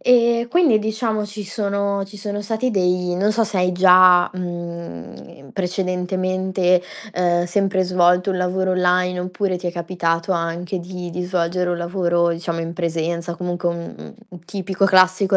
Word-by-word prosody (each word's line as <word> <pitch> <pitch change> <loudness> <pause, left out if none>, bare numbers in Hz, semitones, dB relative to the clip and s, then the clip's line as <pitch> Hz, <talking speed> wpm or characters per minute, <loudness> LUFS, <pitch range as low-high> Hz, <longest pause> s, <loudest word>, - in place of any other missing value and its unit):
Ehm, 235 -1 +3
quindi 300 -5 +3
diciamo 220 0 -2
ci 210 +1 -7
sono 200 -1 -2
ci 200 +2 -13
sono 205 +1 -4
stati 225 +4 -1
dei 180 -3 0
non 205 +4 +2
so 225 +1 +1
se 220 -2 -2
hai 180 0 +2
già, 180 -1 +6
mhmm, 170 - -6
ehm, 140 -1 -15
precedentemente, 185 0 0 0.3
ehm, 175 -1 +1
sempre 195 +1 +1
svolto 180 +1 +3
un 190 - -1
lavoro 185 +1 0
online 180 0 +1
oppure 185 +1 -2
ti 180 - -6
è 175 - -2
capitato 170 0 -1
anche 170 +2 -2
di 180 0 -7
di 180 +2 -4
svolgere 180 0 -1
un 175 - -2
lavoro 170 -1 +1
diciamo 170 0 -3
in 165 +1 -5
presenza 170 0 -2
comunque 175 0 -2
un 170 0 -6
un - - -11
un 175 -3 -13
tipico 195 +1 -2
classico 190 0 +4
180 Hz, 165 wpm, -20 LUFS, 175-195 Hz, 0.3 s, già